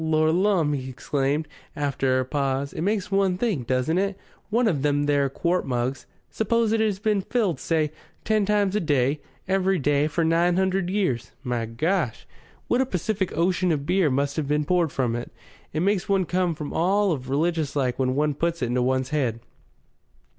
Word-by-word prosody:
Lor' 155 0 +2
lumme!" 175 -4 +2
he 130 -2 -4
exclaimed, 140 +4 -1 0.3
after 135 -2 0
a 130 - -1
pause, 140 0 -1
"it - - -4
makes 205 +2 -1
one 195 -2 +2
think, 185 - -1
doesn't 130 +7 +1
it? 195 0 -1 0.3
One 235 +2 +2
of 155 -10 +1
them 145 0 +1
there 145 -1 +2
quart 175 +6 0
mugs 125 +1 -2 0.2
suppose 225 +1 +1
it 225 - +2
has 215 -3 +1
been 210 -1 +1
filled, 190 - 0
say, 155 -3 0 0.3
ten 215 -2 +2
times 205 -2 +2
a - - +3
day, 145 -4 +1 0.3
every 190 0 +2
day 145 0 +2
for 160 +2 0
nine 170 +2 +3
hundred 190 -1 +1
years 185 - -1
my 120 -3 -2
Gosh! 155 - -1 0.4
what 245 - +2
a - - +2
Pacific 190 - -2
Ocean 180 +1 +2
of 145 -3 -1
beer 180 -1 +2
must 140 +2 -1
have 155 -3 -1
been 150 +1 +1
poured 175 -2 +2
from 120 -3 0
it! 120 - -5 0.4
It 155 - -2
makes 195 0 +1
one 195 -2 +2
come 180 -1 0
over 150 - -5
all 195 +4 +2
of 130 -5 -3
religious 155 +1 0
like 130 -3 0
when 130 -1 +1
one 150 +1 +1
puts 165 +1 -1
it 120 - 0
to 125 - +1
one's 130 +1 0
head." 130 -7 0
160 Hz, 190 wpm, -25 LUFS, 140-190 Hz, 0.4 s, a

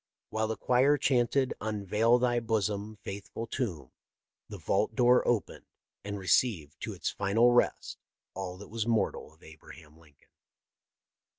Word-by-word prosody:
While 110 0 0
the 110 - -3
choir 130 +4 +3
chanted 130 0 +1
" - - -45
Unveil 110 +2 +1
Thy 120 -1 +1
Bosom, 105 -2 -2
Faithful 100 +3 -6
Tomb," 95 - -4 0.6
the - - -7
vault - - 0
door 125 0 +5
opened 120 -4 -1 0.4
and 100 0 -5
received 85 - +1
to - - -4
its - - -3
final 110 +5 +3
rest 120 - +1 0.3
all 90 -1 -6
that 100 - -11
was 110 0 -3
mortal 110 -9 0
of 80 - -24
Abraham 80 0 -15
Lincoln. 75 -4 -24
110 Hz, 140 wpm, -29 LUFS, 95-120 Hz, 0.6 s, door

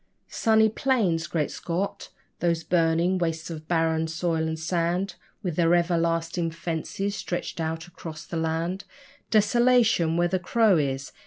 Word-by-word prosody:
'Sunny 220 -1 +3
plains'! 215 - +1
Great 155 -3 -1
Scott! 180 +4 -3 0.3
those 170 -1 0
burning 170 +2 +2
wastes 165 -1 -2
of 155 -1 -8
barren 160 -1 +1
soil 165 -1 -1
and 160 0 -3
sand 175 +4 -1 0.3
With 175 -5 -3
their 170 0 +4
everlasting 170 0 0
fences 170 +4 -3
stretching 175 -3 -4
out 160 0 -3
across 160 -3 -9
the - - -7
land! 165 +4 -1 0.5
Desolation 220 -6 +3
where 175 0 +3
the 185 +1 0
crow 210 +1 +3
is! 135 -2 -2
170 Hz, 140 wpm, -26 LUFS, 160-185 Hz, 0.5 s, their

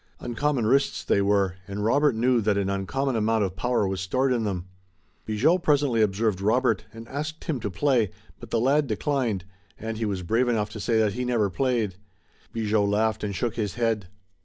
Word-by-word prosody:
Uncommon 125 0 -1
wrists 135 +5 +2
they 100 - +2
were, 100 -2 +1
and 100 +1 -3
Robert 140 +3 +3
knew 120 +1 +2
that 105 -1 +1
an 100 -1 0
uncommon 130 +8 -1
amount 110 0 +2
of 95 -2 -3
power 115 +2 +1
was 95 -1 -2
stored 130 +8 +1
in 115 -3 0
them. 90 -4 -3 0.6
Bigot 145 +12 +2
presently 145 -7 +2
observed 105 -1 +1
Robert, 115 +1 +2
and 115 +1 -10
asked 150 +4 -5
him 150 -6 -2
to 110 -2 -3
play, 120 +1 +2 0.3
but - - -10
the 115 - +1
lad 140 +4 +2
declined, 115 - -1 0.3
and 110 0 -5
he 115 - 0
was 95 -3 -2
brave 115 +8 +1
enough 105 -3 0
to 110 - -7
say 115 +2 +1
that 110 -2 +2
he 125 - -3
never 115 -5 +1
played. 115 -5 0 0.5
Bigot 110 -2 +1
laughed 110 +2 +1
and 100 -1 -2
shook 120 +1 -2
his 105 -3 -2
head. 115 -5 0
110 Hz, 195 wpm, -25 LUFS, 100-125 Hz, 0.6 s, Robert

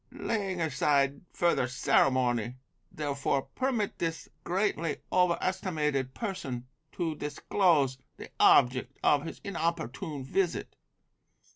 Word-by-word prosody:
Laying 195 -5 -2
aside 140 -2 +1
further 170 -7 +2
ceremony, 125 -2 +2 0.4
therefore, 140 -2 -1
permit 250 -6 -2
this 165 -1 -3 0.2
greatly 175 -4 0
over 180 -2 +3
estimated 150 -8 -1
person 135 - -4 0.3
to 170 -3 -1
disclose 150 -2 +1 0.2
the - - -10
object 125 0 +4
of 145 +1 +3
his - - -7
inopportune 160 - -3
visit. 175 +6 -1
150 Hz, 100 wpm, -29 LUFS, 135-180 Hz, 0.4 s, object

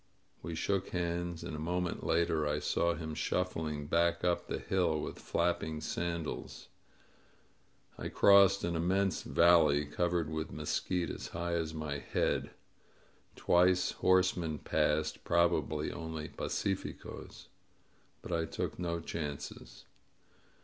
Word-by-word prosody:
We 85 - -5
shook 95 +3 -1
hands, 85 -1 -2
and 75 - -5
a - - -5
moment 90 +2 -2
later 80 -2 +1
I 75 0 0
saw 85 +3 +1
him 80 -1 -5
shuf 90 +4 0
fling 75 -4 -4
back 85 +2 +2
up 90 -1 +1
the - - -2
hill 85 -5 +1
with - - -5
flapping 85 -2 -1
sandals. 85 0 -4 1.3
I - - -3
crossed 100 -1 +6
an 85 0 -1
immense 90 +1 +1
valley 75 -4 +4
covered 85 +2 0
with 80 0 -3
mesquite 90 -2 -1
as - - -6
high 85 +1 -3
as 80 -1 -1
my 75 -2 -3
head. - - 0 0.9
Twice 90 +1 +3
horsemen 90 -4 +2
passed, 75 +1 0
probably 80 -3 +1
only 80 -2 -5
pacificosy - - -4 0.8
but - - -7
I 85 -1 +1
took - - -4
no 85 -1 -2
chances. 75 -3 -6
85 Hz, 125 wpm, -33 LUFS, 80-90 Hz, 1.3 s, crossed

